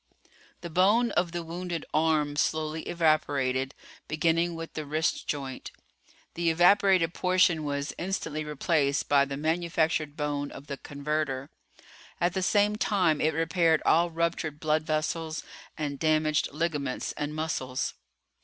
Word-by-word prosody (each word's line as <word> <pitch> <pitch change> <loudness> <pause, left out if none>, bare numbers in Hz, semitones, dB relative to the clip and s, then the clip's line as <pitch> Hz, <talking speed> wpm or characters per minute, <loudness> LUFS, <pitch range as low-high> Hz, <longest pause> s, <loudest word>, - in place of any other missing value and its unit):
The 170 - -7
bone 205 +8 +4
of 175 -1 0
the 175 0 -4
wounded 170 0 -5
arm 155 -2 +2
slowly 155 +1 0
evaporated, 140 -5 +1 0.3
beginning 165 +2 +1
with 165 0 -7
the 155 - -4
wrist 155 +2 -1
joint. 135 -3 -4 0.6
The 170 0 +1
evaporated 175 0 +4
portion 180 -3 +2
was 145 0 -3
instantly 175 -4 -3
replaced 150 -1 0
by 140 -1 +4
the 140 0 -5
manufactured 160 -1 0
bone 145 -1 -2
of - - -10
the 140 -1 -5
converter. 145 -1 -3 0.7
At 175 0 +1
the 190 - -1
same 205 +2 +2
time 180 -9 +2
it 155 0 +1
repaired 165 0 +2
all 170 +1 +4
ruptured 165 -2 -2
blood 155 0 +1
vessels 155 +1 -2 0.3
and 145 -3 -3
damaged 155 -1 +2
ligaments 150 -4 -2
and 150 +1 -4
muscles. 130 -5 -2
155 Hz, 135 wpm, -28 LUFS, 145-170 Hz, 0.7 s, bone